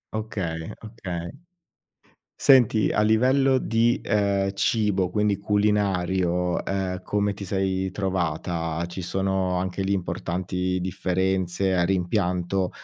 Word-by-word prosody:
Okay, 85 -7 -4
okay. 95 -6 -6 1.0
Senti, 120 -6 +4
a 105 - +1
livello 130 +5 +3
di, 115 0 +1
ehm, 100 -1 +1
cibo, 100 -3 +1
quindi 105 0 +1
culinario, 95 -4 +1
uhm 95 -2 -2
come 105 0 0
ti 100 - -8
sei 95 0 -1
trovata? 85 -3 -2
Ci 85 +2 -7
sono 95 0 -1
anche 95 +1 -2
lì 95 +1 0
importanti 90 +1 -2
differenze, 95 0 0
hai 85 0 +2
rimpianto 90 0 0
95 Hz, 110 wpm, -25 LUFS, 90-105 Hz, 1.0 s, Senti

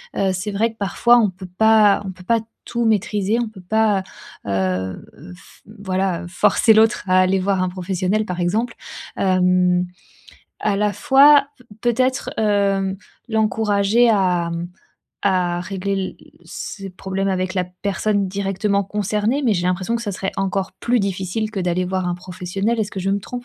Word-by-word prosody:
heu, 195 -1 +1
c'est 185 +3 -3
vrai 220 +3 0
que 225 - -23
parfois, 235 +4 +3
on 210 -4 +3
peut 185 0 -11
pas 220 -2 +5
on 190 - -4
peut 185 0 -15
pas 230 +4 +2 0.3
tout 235 -1 -2
maîtriser, 210 0 +1
on 230 - -3
peut 205 -3 -14
pas, 210 +1 +1 0.4
heu, 95 -1 -2 0.3
f - - -19 0.2
voilà, 190 -2 -1
heu, - - -8
forcer 220 +4 +3
l'autre 220 +1 +3
à 185 0 +5
aller 185 +1 +3
voir 190 0 0
un 185 - +1
professionnel 185 +3 -1
par 180 -3 -5
exemple, 215 +7 -1 0.4
hem, 180 -1 +2 0.7
à 210 -2 0
la 210 +1 +1
fois, 280 +5 +5 0.3
peut-être, 255 +3 0
hem, 200 -2 +1 0.3
l'encourager 220 +1 +2
à, 180 -5 +2
mmh, 170 +1 -4 0.6
à 180 -3 +1
régler 195 +1 -4
l 190 -1 -3 0.3
ses 195 -1 -7
problèmes 190 +1 -3
avec 185 0 -1
la 185 - 0
personne 200 +2 -1
directement 200 +1 -1
concernée, 210 +6 -1
mais 220 -4 +3
j'ai 175 0 -1
l'impression 185 +6 0
que 235 - -5
ce 205 -3 -3
serait 190 +1 -3
encore 195 0 -1
plus 240 0 +1
difficile 195 +2 -2
que 215 - -5
d'aller 180 0 0
voir 185 -1 -2
un 175 - -1
professionnel, 185 +5 -3
est-ce 210 -2 -2
que 190 - -4
je 195 +1 -1
me 200 - +1
trompe? 245 +5 -7
195 Hz, 170 wpm, -20 LUFS, 185-215 Hz, 0.7 s, pas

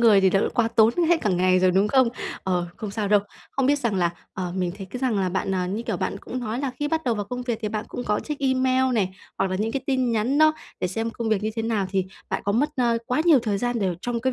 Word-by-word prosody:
người 220 -4 +6
thì 190 -1 +4
thật 195 - +3
là - - +1
quá 235 -2 +2
tốn 225 -1 +5 0.2
hết 340 -1 +4
cả 210 - +1
ngày 185 0 +3
rồi, 185 0 +4
đúng 195 +3 +3
không? 260 0 +4 0.3
Ờ, 180 -2 0
không 215 - -5
sao 205 0 -2
đâu. 205 0 +5 0.3
Không 270 -1 0
biết 290 +1 +3
rằng 235 -6 -1
là, 175 -3 +2 0.2
ờ, 180 -2 -3
mình 180 -2 -1
thấy 195 - -6
cái 245 +7 -7
rằng 250 -6 +1
là 185 - +1
bạn, 190 +1 -2
ờ, 180 -1 0
như 205 +5 -3
kiểu, 225 -5 -2
bạn 185 - -2
cũng 255 +5 -6
nói 240 +1 -3
là 275 -2 -1
khi 295 - -1
bắt 320 +1 -1
đầu 240 -3 +1
vào 205 -1 -3
công 250 +4 -5
việc 240 -3 -2
thì 215 - 0
bạn 215 +1 -3
cũng 245 - -5
có 210 0 0
check 300 -2 -5
email 260 -1 +2
này 195 -5 +1 0.3
hoặc 195 -1 +1
là 185 - 0
những 220 +3 -1
cái 270 - -2
tin 260 -4 +1
nhắn 230 +6 +1
đó 310 0 +6 0.3
để - - +1
xem 225 +5 -2
công 230 0 -4
việc 215 -2 +1
như 215 - 0
thế 225 - -1
nào, 220 -4 0
thì 190 -1 +1 0.3
bạn - - -1
có 200 - +1
mất, 265 +8 +2
a, 240 -2 +2
quá 250 +4 +1
nhiều 325 -5 +7
thời 205 -3 0
gian 245 +2 -1
để 190 -4 0
trong 240 +1 -2
cái 260 +2 0
225 Hz, 305 wpm, -24 LUFS, 195-255 Hz, 0.3 s, nhiều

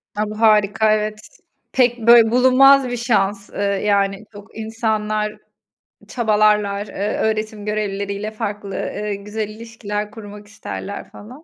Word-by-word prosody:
A, 210 0 -1
bu 215 +1 -7
harika, 215 0 +4
evet. 215 0 -2 0.5
Pek, 245 -2 +2
böyle 235 -2 +7
bulunmaz 260 +1 +5
bir 245 - -3
şans, 205 -4 0
ııı, - - -6 0.2
yani, 200 0 0
yok 205 0 -12
insanlar 215 -1 -2 0.7
çabalarlar, 210 -3 +1
eee, 205 +2 -3
öğretim 215 -1 -2
görevlileri 200 -1 -2
ile 210 +2 -5
farklı, 205 -2 -5
eee, 210 -1 -3
güzel 210 +1 -5
ilişkiler 215 -2 -6
kurmak 210 -1 -11
isterler 205 -1 -7
falan. 250 +9 -13
215 Hz, 130 wpm, -20 LUFS, 205-225 Hz, 0.7 s, böyle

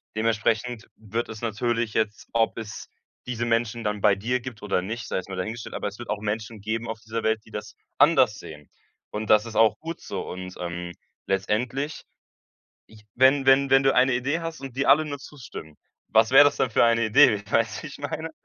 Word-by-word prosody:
dementsprechend 110 +1 0
wird 110 +2 -4
es 110 -1 -8
natürlich 115 0 -1
jetzt 110 -1 -1
ob 115 0 +1
es 110 -1 -8 0.4
diese 120 -1 -3
Menschen 115 0 0
dann 105 -1 -2
bei 105 0 +5
dir 120 +6 -1
gibt 120 -3 -9
oder 100 -3 -1
nicht, 110 +3 -5
sei - - -4
jetzt 95 +1 -5
mal 95 - -5
dahingestellt, 110 +5 -5
aber - - -3
es 100 0 -7
wird 120 - -6
auch 105 -1 -3
Menschen 110 0 -4
geben 110 +3 -3
auf 110 0 -5
dieser 115 0 -4
Welt, 110 0 +1
die - - -19
das 105 0 -7 0.2
anders 130 -9 +4
sehen, 75 -2 -11 0.4
und 105 0 -3
das 105 +1 +5
ist 115 - -9
auch 110 -1 +4
gut 165 +1 -6
so. 100 - -5
Und, 90 0 -7
ähm, 85 0 -5 0.3
letztendlich 120 +9 -2 0.8
ich 110 -1 -18
wenn 135 +2 +5
wenn 135 +1 +5
wenn 135 0 +6
du 135 0 +4
eine 130 +1 +4
Idee 135 +6 0
hast 165 -3 -6
und 135 -2 -8
dir 140 - 0
alle 145 +3 +6
nur 145 -2 -5
zustimmen, 125 - -10 0.3
was 110 +1 +4
wäre 135 +2 +9
das 145 - +2
denn 130 - +1
für - - +4
eine 115 0 +3
Idee, 105 -1 +5
weißt 115 0 +1
du, - - -8
wie - - -7
ich 140 - -11
meine? 155 +3 -4
115 Hz, 215 wpm, -25 LUFS, 105-130 Hz, 0.8 s, wäre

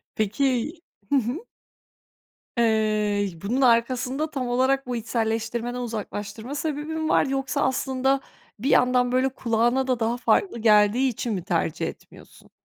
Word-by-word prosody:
Peki 245 - 0 0.4
Hı - - +2
hı, 250 +2 +1 1.2
eee, 215 -3 +2
bunun 240 +7 -1
arkasında 255 +4 +2
tam 260 -3 -3
olarak 260 +2 +1
bu 245 -1 -2
içselleştirmeden 230 +1 -2
uzaklaştırma 220 +1 -5
sebebi 295 0 -3
mi 315 0 -2
var, - - +3
yoksa 270 0 -1
aslında 265 +1 +1 0.4
bir 255 - -2
yandan 250 0 +3
böyle 255 +1 +3
kulağına 240 +1 +1
da 255 -2 0
daha 230 +1 0
farklı 245 - +1
geldiği 215 +4 +4
için 235 -1 -3
mi 185 - -3
tercih 165 -4 -1
etmiyorsun? - - -12
245 Hz, 135 wpm, -24 LUFS, 220-265 Hz, 1.2 s, geldiği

